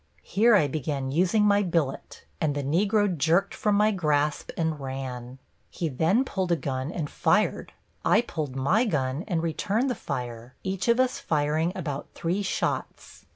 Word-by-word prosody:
Here 220 +4 +4
I 155 -8 +4
began 140 -3 -3
using 185 +7 +3
my 205 0 +4
billet, 165 -8 -2 0.2
and 150 -2 +1
the 145 - -2
Negro 200 +8 +2
jerked 170 +6 +2
from 210 -1 +1
my 210 +1 +4
grasp 150 -6 0
and 160 -2 -1
ran. 130 -2 -6 0.3
He 165 - -3
then 165 - +2
pulled 190 -7 -2
a - - +5
gun 135 -1 -3
and 160 -5 -3
fired. - - +1 0.3
I 210 - +4
pulled 155 - -5
my 160 - +2
gun 140 - -1
and 170 -5 -1
returned 205 - 0
the - - +1
fire, 125 - -6
each 190 +1 -2
of 235 +1 +4
us 255 0 +2
firing 155 +2 0
about 145 -6 -4
three 175 +4 -1
shots. 195 - -3
160 Hz, 165 wpm, -26 LUFS, 140-200 Hz, 0.3 s, a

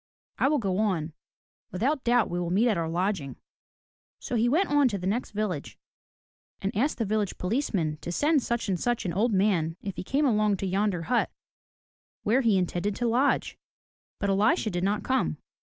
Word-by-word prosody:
I - - +4
will 300 +1 +2
go 195 -6 -1
on. 175 -7 0 0.6
Without 265 +9 -1
doubt 240 -1 +3
we 175 - -3
will 175 -1 -2
meet 205 +7 +3
at 215 - +2
our 165 -2 -2
lodging." 170 -6 -1 0.8
So 250 - -4
he 235 +1 +3
went 340 +9 +2
on 290 -2 +5
to 205 -5 -1
the 180 - -6
next 215 +6 -1
village, 205 -8 -3 0.8
and 195 +1 -3
asked 270 +9 +1
the 230 - -1
village 210 -1 -1
police 230 +11 -1
man 155 -6 -1
to 175 - -5
send 295 - +2
such 235 -1 -2
and 185 -3 0
such 240 +1 -1
an 175 - -1
old 220 +6 +1
man 185 -5 +1
if 195 -2 -5
he - - -4
came 280 +9 +1
along 210 -5 +2
to 195 - -3
yonder 190 -2 0
hut 240 +8 +1 0.9
where 235 +6 +3
he 225 -6 +3
intended 185 +2 -1
to 240 - -1
lodge. 250 +5 +1 0.6
But 200 -1 0
Elisha 205 +2 +2
did 175 0 -2
not 205 +2 0
come. 260 0 0
210 Hz, 195 wpm, -27 LUFS, 180-240 Hz, 0.9 s, on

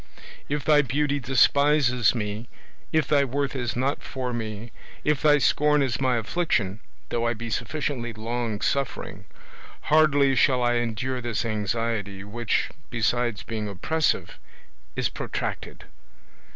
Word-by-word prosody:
If 145 -1 -2
thy 150 -1 +6
beauty 145 +1 0
despises 135 -1 +3
me, 105 +1 -4 0.4
if 155 -3 +2
thy 145 -2 +4
worth 140 +1 -2
is 120 -3 -2
not 130 +3 0
for 125 -2 -4
me, 110 -1 -5 0.3
if 150 -2 +1
thy 150 -1 +6
scorn 150 +1 +3
is 130 -1 -1
my 130 -2 +2
affliction, 110 - 0 0.3
though 115 0 0
I 120 - 0
be 115 +1 -6
sufficiently 135 -3 -2
long 115 0 -3
suffering, 140 -2 -2 0.7
hardly 145 -3 +5
shall 130 -1 +3
I 120 0 +2
endure 120 +2 -2
this 120 -1 -2
anxiety, 105 -2 -2
which, 110 +2 -1 0.2
besides 120 -2 0
being 110 -1 -4
oppressive, 155 - -1 0.6
is - - +1
protracted. - - -5
120 Hz, 130 wpm, -25 LUFS, 115-140 Hz, 0.7 s, thy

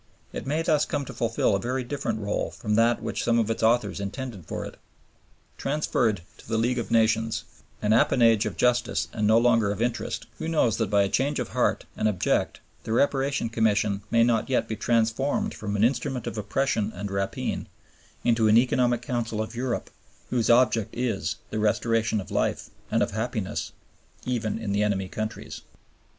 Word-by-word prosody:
It - - -5
may 155 +4 0
thus 155 -3 +3
come 145 -1 -2
to - - -8
fulfil 115 -4 +1
a - - 0
very 125 +3 -2
different 120 -4 -3
rÙle 100 0 -2
from 105 - -2
that 115 +2 +3
which - - -2
some 115 -1 +2
of 115 -1 +1
its 115 - -3
authors 110 -3 +2
intended 100 - -6
for - - -4
it. - - -9 0.8
Transferred 120 - 0 0.2
to - - -15
the 110 - +1
League 120 +2 +1
of 115 - -4
Nations, 115 0 +2 0.4
an 105 +1 +3
appanage 115 -2 +4
of 90 -6 -6
justice 125 -1 +1
and 105 -1 0
no 110 +1 +6
longer 115 -3 +4
of 100 - -3
interest, 120 +1 -2
who - - -3
knows 155 -9 +2
that 110 -4 0
by 100 -1 +4
a - - +1
change 140 +8 0
of - - -3
heart - - 0
and 110 - +1
object 100 -4 0 0.2
the 110 - -5
Reparation 135 +2 +1
Commission 105 -3 +1
may 115 0 +4
not 115 +1 +1
yet 130 - +1
be 110 - -3
transformed 120 - +1
from 105 -1 -4
an 105 - +2
instrument 130 0 0
of - - -4
oppression 110 0 0
and 100 +2 -5
rapine 100 0 -2 0.6
into 115 -2 +3
an 110 +1 +6
economic 120 -1 +2
council 120 -3 -2
of 110 +2 -3
Europe, 120 0 -3 0.4
whose 120 -3 +1
object 120 -3 +4
is 120 -5 -1 0.2
the 110 - -2
restoration 110 +1 +1
of 95 - -8
life - - -1 0.2
and - - +2
of - - -2
happiness, - - -3 0.5
even 120 -4 -1
in 100 - -4
the 100 +1 +1
enemy 100 -3 0
countries? 110 +3 -5
115 Hz, 185 wpm, -26 LUFS, 105-125 Hz, 0.8 s, no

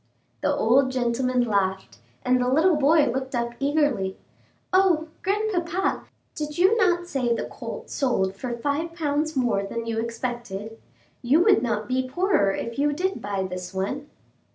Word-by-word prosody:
The - - +2
old 260 +4 +3
gentleman 250 0 +1
laughed, 190 - -1 0.3
and 250 0 +3
the 250 - +1
little 315 +7 +4
boy 300 +1 +4
looked 260 +2 -2
up 235 0 -1
eagerly. 280 -10 +1 0.6
"O, 355 -4 +3
grandpapa, 385 -2 -1 0.3
did 300 0 -5
you 375 +5 +5
not 355 -6 +2
say 255 -8 0
the - - -2
colt - - -8
sold 195 -9 0
for 240 +3 -4
five 295 +6 -2
pounds 305 -1 -1
more 240 -6 +1
than 230 +4 -4
you 225 -1 -2
expected? 230 -2 -5 0.4
You 280 +8 +4
would 410 0 +5
not 215 -3 -1
be 255 +1 -1
poorer 280 - +2
if 230 +5 -4
you 290 +1 +2
did 375 +5 -2
buy 200 -1 -2
this 180 0 -6
one." 270 +10 -3
260 Hz, 155 wpm, -25 LUFS, 230-315 Hz, 0.6 s, you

